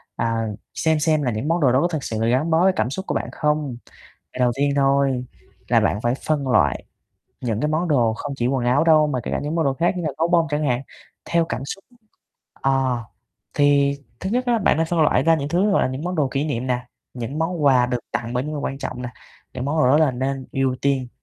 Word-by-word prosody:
à, 115 -1 -1 0.3
xem 160 -1 +1
xem 155 -1 +2
là 125 - 0
những 110 +6 -3
món 165 +2 +1
đồ 130 -4 +4
đó 130 - +3
có 175 - +2
thực 155 -6 -4
sự 110 - -3
là 115 - +1
gắn 130 +7 +1
bó 165 +1 +3
với 190 0 +4
cảm 110 +3 0
xúc 190 +8 -5
của - - -2
bạn - - -2
không? 150 -4 -1 0.6
À, - - -8
đầu 125 -1 +3
tiên 140 +1 +1
thôi 135 -2 +2 0.4
là - - +4
bạn 100 - 0
phải 120 +2 +1
phân 145 -3 0
loại 125 - +2 0.6
những 115 -4 -1
cái 150 - +1
món 155 +3 0
đồ 120 -7 +2
không 140 +5 -5
chỉ 120 -2 0
quần 130 -2 0
áo 125 +5 +3
đâu, 155 -2 +5
mà 135 -4 -1
kể - - -4
cả - - 0
những 150 +3 -3
món 165 -2 +1
đồ 135 - +2
khác 170 +7 +1
như 175 - -3
là 155 - 0
gấu 165 - +1
bông 170 -2 +3
chẳng 150 +1 -1
hạn, 125 -2 0 0.4
theo 170 -1 +1
cảm - - -4
xúc. 195 +7 -7 0.8
Ờ, 135 -2 +1 0.6
thì 140 -1 +3 0.2
thứ 190 - -3
nhất 250 +3 0
á, 240 -1 +2
bạn 190 - +2
nên 165 +1 +1
phân 170 0 0
loại 145 -4 +3
ra 165 +3 +4
những 145 -3 -2
thứ, 185 +6 +2
gọi - - +3
là, - - +1
những 130 +4 -5
món 180 +1 -2
đồ 150 -5 +1
kỷ 140 +2 -1
niệm 130 -5 -2
nè, 125 -1 -2 0.3
những 125 +5 -5
món 165 -1 -1
quà 130 -3 +5
được 125 0 -1
tặng 115 0 -3
bởi 125 - 0
những 150 - -4
người 150 - -3
quan 135 - -4
trọng 125 -3 -5
nè. 125 - -4 0.5
Những 125 - -4
món 145 +3 -1
đồ 155 - +4
đó 145 - +5
là 155 -3 +4
nên 130 +1 -3
ưu 135 -1 0
tiên, 135 -3 +1
140 Hz, 265 wpm, -22 LUFS, 125-160 Hz, 0.8 s, đâu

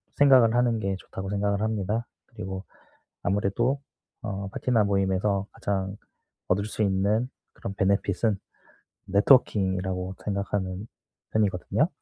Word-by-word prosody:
생각을 130 -5 +6
하는 120 -2 +3
게 95 -2 -1
좋다고 95 0 -7
생각을 100 0 0
합니다. 110 +1 -1 0.2
그리고 95 +1 -6 0.6
아무래도 105 +7 +1 0.4
어 100 -2 -4
파티나 115 -5 +2
모임에서 100 0 +1
가장 95 0 -2 0.5
얻을 100 +3 +2
수 110 - -2
있는 100 +5 +2 0.3
그런 100 - -6
베네핏은 100 +2 +1 0.7
네트워킹이라고 95 -4 +3
생각하는 100 -1 -2 0.5
편이거든요. 110 - +1
100 Hz, 295 characters per minute, -27 LUFS, 95-110 Hz, 0.7 s, 생각을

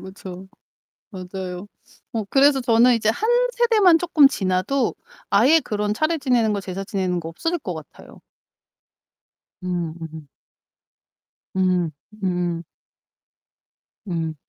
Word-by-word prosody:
그쵸. 190 -1 -10 0.6
맞아요. 185 0 -7 0.5
어 220 -3 -2
그래서 275 0 +4
저는 240 +1 +4
이제 220 -2 0
1 415 - 0 0.2
세대만 440 -8 +4
쪼끔 310 -5 +5
지나도 195 +5 0 0.4
아예 260 +11 +5
그런 210 -3 -2
차례 310 +7 0
지내는 245 -6 +2
거, 200 - -1
제사 190 +1 -6
지내는 185 -3 -1
거 165 - -7
없어질 330 - -2
것 185 - -5
같아요. 155 -2 -12 1.4
음음. 165 -3 -5 1.3
음. 180 -3 +1 0.3
음. 175 -2 -1 1.4
음. 165 -3 -2
195 Hz, 205 characters per minute, -22 LUFS, 180-265 Hz, 1.4 s, 쪼끔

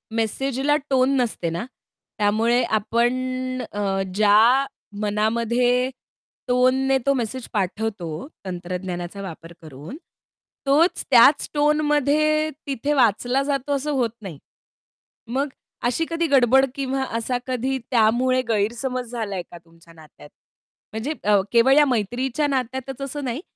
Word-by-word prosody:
मेसेजला 270 +5 0
tone 265 +1 +3
नसते 220 -9 -1
ना. 170 +7 -4 0.5
त्यामुळे 220 +4 +2
आपण 230 +3 +1 0.6
अ, 195 -2 -1
ज्या 220 +6 +5 0.4
मनामध्ये 235 +4 +1 0.6
टोनने 255 +2 +3
तो 275 - +3
मेसेज 250 -1 -3
पाठवतो 195 - -3 0.2
तंत्रज्ञानाचा 180 +1 -5
वापर 170 -2 -9
करून, 155 - -10 0.7
तोच 305 +6 +3
त्याच 270 +4 +6
टोनमध्ये 300 +1 +2 0.2
तिथे 280 +2 -1
वाचला 250 +1 +2
जातो 280 0 -1
असं 290 +2 -2
होत 250 -5 +1
नाही. 180 -8 -8 0.9
मग 265 +5 -1 0.4
अशी 250 +7 +1
कधी 330 0 0
गडबड 265 -1 +5
किंवा 270 -1 -2
असा 245 +2 -1
कधी 260 +1 -1
त्यामुळे 250 +2 +3
गैरसमज 235 +3 -1
झालाय 210 -6 -3
का 175 - -9
तुमच्या 165 0 -20
नात्यात? 155 -2 -16 0.6
म्हणजे 230 +8 -3
अ, 205 -1 +4
केवळ 240 +3 +5
अ, 285 - +4
या 295 - +7
मैत्रीच्या 250 +4 -1
नात्यातच 265 0 -3
असं 275 +1 -4
नाही, 250 +4 -3
245 Hz, 120 wpm, -23 LUFS, 210-270 Hz, 0.9 s, या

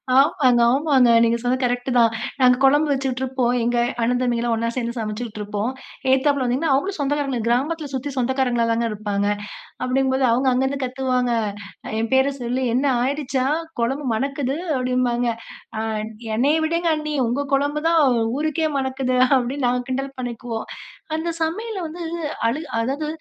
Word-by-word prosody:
ஆமாங்க, 260 -3 +4
ஆமாங்க. 270 -2 +4
நீங்க 230 0 +2
சொன்னது 250 +2 0
கரெக்ட்டு 245 +1 -1
தான். 230 -1 +5 0.3
நாங்க 250 -1 +6
குழம்பு 290 +3 +4
வச்சுக்கிட்டு 265 -2 -1
இருப்போம். 255 -2 0
எங்க 240 +1 +1 0.2
அண்ணன், 245 +2 +1
தம்பிங்கலாம் 240 -1 0
ஒண்ணா 230 +1 -1
சேர்ந்து 235 -2 -2
சமைச்சுக்கிட்டு 215 0 -4
இருப்போம். 210 +3 -2 0.4
எகுத்தாப்ல 270 +1 +3
வந்தீங்கன்னா 265 +5 0
அவங்களும் 375 +9 0
சொந்தக்காரங்க, 280 -2 -1
கிராமத்தில 290 +6 0
சுத்தி 265 +2 -3
சொந்தக்காரங்களா 250 -2 +1
தாங்க 230 +1 +1
இருப்பாங்க. 205 -1 -2 0.6
அப்படிங்கும்போது 260 +1 +1
அவங்க 255 +3 +2
அங்கேருந்து 265 +2 0
கத்துவாங்க. 255 -1 0 0.7
என் 225 0 -1
பேர 265 +1 +3
சொல்லி, 250 +2 -2
"என்ன 270 +3 +2 0.2
ஆயிடுச்சா? 270 -1 -1 0.4
குழம்பு 265 +5 -1
மணக்குது." 275 +3 -1 0.2
அப்படின்பாங்க. 250 -1 0 0.5
அ - - -1 0.6
"என்னைய 280 +6 +3
விடுங்க 335 +1 +1
அண்ணி, 305 0 -3
உங்க 255 +5 -1
குழம்பு 290 +2 0
தான் 330 -1 +4 0.4
ஊருக்கே 315 +1 0
மணக்குது." 265 -1 -1 0.2
அப்படின்னு 260 +2 -2
நாங்க 250 0 0
கிண்டல் 270 +1 -2
பண்ணிக்குவோம். 240 -2 -5 0.5
அந்த 320 +2 -3
சமையல 405 +6 -2
வந்து 330 +3 -8 0.5
அழு 240 +7 0 0.2
அதாவது 275 +6 -2
260 Hz, 145 wpm, -22 LUFS, 240-280 Hz, 0.7 s, நாங்க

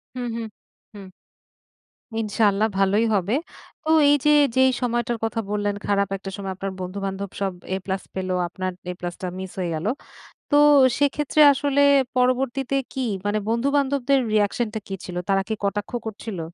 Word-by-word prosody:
হুম, 245 -1 -3
হুম, 225 -1 -4 0.5
হুম। 200 -2 -10 1.1
ইনশাআল্লাহ 215 0 +2
ভালোই 200 +3 +3
হবে। 200 +4 +1 0.5
তো - - -5 0.2
এই 290 - +6
যে 300 - +5 0.3
যেই 260 0 +5
সময়টার 240 -1 -1
কথা 225 0 -1
বললেন 205 -1 0
খারাপ 200 -1 +1
একটা 195 0 -7
সময় 195 -1 -4
আপনার 195 0 -4
বন্ধু-বান্ধব 195 +1 -4
সব 195 -1 0 0.2
A+ 190 0 -3
পেলো, 185 -1 -2
আপনার 185 +1 -4 0.2
A+ 175 -1 -5
টা 185 - -2
মিস 190 -1 -6
হয়ে 175 -2 -1
গেলো। 170 +8 -1 0.6
তো - - +4 0.4
সেক্ষেত্রে 290 +1 +2
আসলে 285 0 +1 0.3
পরবর্তীতে 255 +1 +1 0.2
কি 265 - -3 0.2
মানে 205 +1 +1
বন্ধু-বান্ধবদের 275 +2 +1
রিঅ্যাকশনটা 215 +1 0
কি 195 - -4
ছিল? 180 - -7
তারা 195 0 +3
কি 220 - -1
কটাক্ষ 205 +1 -2
করছিল? 215 -3 -6
210 Hz, 150 wpm, -23 LUFS, 195-250 Hz, 1.1 s, এই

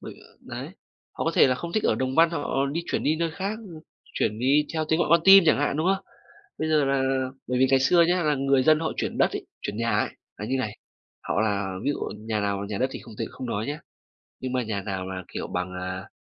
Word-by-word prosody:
bởi - - -9
ờ, - - -25
đấy, - - -7 0.4
họ - - -4
có - - +2
thể - - +7
là 130 - +2
không 170 +6 -6
thích 215 - 0
ở - - +3
Đồng 130 +3 -2
Văn, 165 +1 +5
họ 165 - -2
họ 140 -1 0
đi 170 - -1
chuyển - - -1
đi 155 +2 +2
nơi 165 0 -1
khác, 200 +6 -4
ư, 175 -8 -11 0.3
chuyển 105 - 0
đi 140 +4 +3
theo 155 -1 0
tiếng 160 - +2
gọi 170 - +1
con 170 0 +6
tim 195 -2 +9
chẳng 155 - +5
hạn, 145 0 0
đúng 160 +3 0
không? 195 +1 +1 0.5
Bây 155 - -1
giờ 155 -2 +3
là 135 -1 +1 0.2
bởi 125 0 -1
vì 130 - +5
ngày 135 -1 +5
xưa 170 +5 +5
nhá, 180 0 +2
là 150 -1 +2
người 135 -1 +2
dân 155 +3 +4
họ 160 - -1
chuyển - - -3
đất - - +4
ấy, - - -5 0.2
chuyển 105 0 -4
nhà 115 -2 +1
ấy - - +1 0.3
là 105 - -5
như 130 +3 0
này, 110 -4 -3 0.4
họ 100 - -1
là 100 -3 0
ví - - +2
dụ - - -6 0.2
nhà 110 0 -2
nào 100 0 -1
nhà 105 -2 -3
đất 130 - +1
thì - - -6
không 115 - -12
tính 115 - -2
không 130 - -7
nói 110 -1 -2
nhá, 145 +2 -3 0.6
nhưng 130 -1 -4
mà 125 -1 +1
nhà 105 -3 -3
nào 95 -2 -4
là, 95 -1 -5
kiểu, - - -4
bằng, 90 0 -3
à 90 +1 -5
130 Hz, 275 wpm, -25 LUFS, 105-155 Hz, 0.6 s, tim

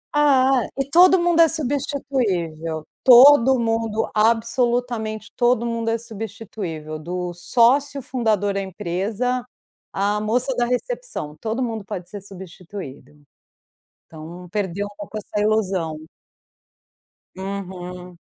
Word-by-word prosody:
Ah, 270 -3 +4 0.2
e 275 0 -1
todo 360 +2 +7
mundo 345 -1 +2
é 330 - +7
substituível, 230 - -2 0.2
todo 265 0 +8
mundo 225 -1 0
absolutamente 230 0 0
todo 240 -1 +2
mundo 230 -1 -2
é 225 - +1
substituível 205 -8 -7
do 175 +2 -4
sócio 255 +9 +2
fundador 220 -6 0
da 195 - -1
empresa, 205 +7 -2 0.5
à 205 +2 0
moça 245 +4 0
da 240 -1 +1
recepção, 250 - -3
todo 230 +3 -2
mundo 225 -3 -4
pode 180 -2 -7
ser 205 -2 -7
substituído. 180 -7 -10 0.9
Então 165 +3 -10
perdeu 200 -1 -2
um 205 0 -11
pouco 210 +1 -7
essa 210 0 -3
ilusão. 190 -7 0 1.4
Uhum. 180 -2 -7
215 Hz, 110 wpm, -22 LUFS, 185-250 Hz, 1.4 s, todo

